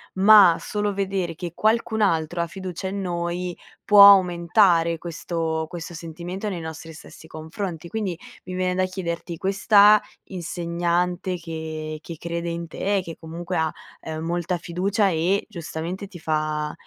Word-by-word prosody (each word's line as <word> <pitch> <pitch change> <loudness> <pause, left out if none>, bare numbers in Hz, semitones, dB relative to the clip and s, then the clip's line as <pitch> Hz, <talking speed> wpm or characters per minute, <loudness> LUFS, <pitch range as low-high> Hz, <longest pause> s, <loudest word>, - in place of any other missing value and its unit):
Ma 195 -3 +7
solo 205 -1 -2
vedere 190 -3 -2
che 170 +1 -6
qualcun 220 0 +1
altro 170 -3 +1
ha 170 - -1
fiducia 190 +1 -6
in 195 +1 -3
noi 175 0 -3 0.3
può 205 -1 +9
aumentare 170 -3 +4
questo 165 -1 -3
questo 175 0 -8
sentimento 175 +5 -6
nei 180 -4 -4
nostri 160 0 -8
stessi 150 - -13
confronti. 165 +1 -6
Quindi, 205 -6 -3 0.3
mi 185 - -8
viene 180 0 -1
da 185 0 +2
chiederti, 170 -2 -5
questa 205 +2 +5 0.3
insegnante 175 +1 -2
che 160 -2 -6
che 165 - -8
crede 170 +1 -4
in 170 0 -4
te, 195 +4 -1
che 165 -2 -8
comunque 170 +2 -5
ha, 160 -1 +1 0.3
ehm, 160 0 -5
molta 175 +1 -1
fiducia 195 +4 0
e, 175 +4 0
giustamente, 170 +3 -5
ti 175 -3 -12
fa 155 -1 -1
175 Hz, 145 wpm, -23 LUFS, 165-190 Hz, 0.3 s, può